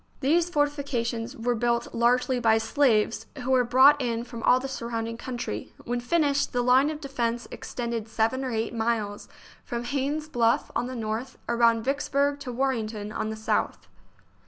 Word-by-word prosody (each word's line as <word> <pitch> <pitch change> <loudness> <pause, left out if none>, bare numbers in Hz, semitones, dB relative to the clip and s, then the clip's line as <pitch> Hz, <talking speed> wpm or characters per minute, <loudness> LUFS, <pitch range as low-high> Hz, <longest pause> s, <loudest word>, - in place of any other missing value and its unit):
These 330 +5 +2
fortifications 280 -6 -1
were 245 +1 0
built 235 0 0
largely 250 +2 +2
by 225 -2 +4
slaves, 225 -1 +1 0.2
who 260 - -1
were 255 -1 +5
brought 260 +4 +6
in 235 -2 -1
from 235 -1 -8
all 250 - +5
the 270 - -4
surrounding 230 -3 -4
country. 235 - -5
When 245 +1 -1
finished, 285 +2 +1
the 245 0 +1
line 260 +4 +4
of 310 -1 -5
defence 240 -5 -2
extended 235 -2 -4
seven 225 +4 0
or 260 - -2
eight 225 0 -2
miles, 225 -3 -2 0.3
from 235 0 -4
Haynes's 285 +4 -2
Bluff, 235 -6 +1
on 245 - 0
the 255 - -6
north, 225 +3 -4
around 235 -1 +3
Vicks 280 +2 -1
burg 280 +1 +2
to 270 -3 -6
Warrenton, 225 -5 -2
on 215 - -3
the 220 - -4
south. 220 0 -1
240 Hz, 170 wpm, -26 LUFS, 230-270 Hz, 0.3 s, brought